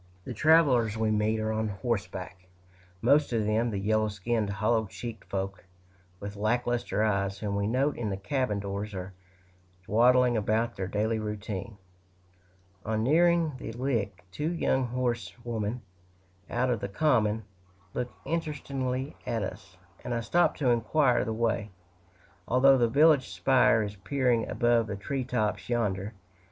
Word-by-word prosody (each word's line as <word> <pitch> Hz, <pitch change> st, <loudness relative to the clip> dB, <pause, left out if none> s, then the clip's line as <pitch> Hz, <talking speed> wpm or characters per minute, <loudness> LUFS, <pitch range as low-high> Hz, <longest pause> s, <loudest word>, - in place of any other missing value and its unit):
The 130 Hz, -, -5 dB
travelers 130 Hz, -6 st, +4 dB
we 110 Hz, -1 st, +1 dB
meet 110 Hz, +1 st, +1 dB
are 110 Hz, 0 st, -1 dB
on 110 Hz, 0 st, -1 dB
horseback 100 Hz, -4 st, -4 dB, 0.6 s
most 140 Hz, +4 st, +4 dB
of 110 Hz, -2 st, +1 dB
them 110 Hz, +3 st, +1 dB
the 105 Hz, -, -3 dB
yellow 110 Hz, +2 st, +1 dB
skinned, 105 Hz, +1 st, -1 dB
hollow 110 Hz, +2 st, +1 dB
cheeked 115 Hz, +3 st, -8 dB
folk, 95 Hz, -1 st, -3 dB, 0.6 s
with 100 Hz, 0 st, -7 dB
lack 110 Hz, +4 st, 0 dB
luster 120 Hz, -3 st, 0 dB
eyes, 100 Hz, -2 st, 0 dB
whom 100 Hz, -1 st, -3 dB
we 100 Hz, 0 st, 0 dB
note 135 Hz, +6 st, +1 dB
in 115 Hz, -3 st, -2 dB
the 95 Hz, -, -2 dB
cabin 125 Hz, 0 st, -1 dB
doors, 100 Hz, +1 st, -4 dB
or 95 Hz, +1 st, -6 dB, 0.7 s
dawdling 125 Hz, +2 st, +4 dB
about 110 Hz, +2 st, 0 dB
their 95 Hz, -1 st, -3 dB
daily 110 Hz, +3 st, 0 dB
routine. 105 Hz, -1 st, -5 dB, 1.1 s
On 110 Hz, 0 st, -1 dB
nearing 170 Hz, +4 st, +3 dB
the 115 Hz, -, -6 dB
Lick, 115 Hz, -7 st, -2 dB
two 150 Hz, -, -2 dB
young 130 Hz, -6 st, +1 dB
horsewomen, 120 Hz, -2 st, -3 dB, 0.7 s
out 125 Hz, +1 st, +1 dB
of 120 Hz, -, 0 dB
the 100 Hz, -, -4 dB
common, 110 Hz, -3 st, +2 dB, 0.5 s
look 125 Hz, 0 st, -3 dB
interestedly 140 Hz, -4 st, -3 dB
at 115 Hz, -3 st, -1 dB
us, 95 Hz, -1 st, -8 dB, 0.3 s
and 120 Hz, -, -2 dB
I 115 Hz, -, -1 dB
stop 175 Hz, +11 st, +2 dB
to 130 Hz, -4 st, +2 dB
inquire 125 Hz, +3 st, +2 dB
the 115 Hz, -, -3 dB
way, 110 Hz, -1 st, -1 dB, 0.8 s
although 130 Hz, +2 st, +5 dB
the 120 Hz, -, +4 dB
village 145 Hz, +1 st, +4 dB
spire 130 Hz, -4 st, +3 dB
is 105 Hz, 0 st, -5 dB
peering 120 Hz, +3 st, 0 dB
above 120 Hz, -2 st, +2 dB
the 100 Hz, -, -3 dB
tree 130 Hz, +7 st, -3 dB
tops 110 Hz, -3 st, -2 dB
yonder. 105 Hz, -4 st, -1 dB
115 Hz, 150 wpm, -28 LUFS, 105-125 Hz, 1.1 s, although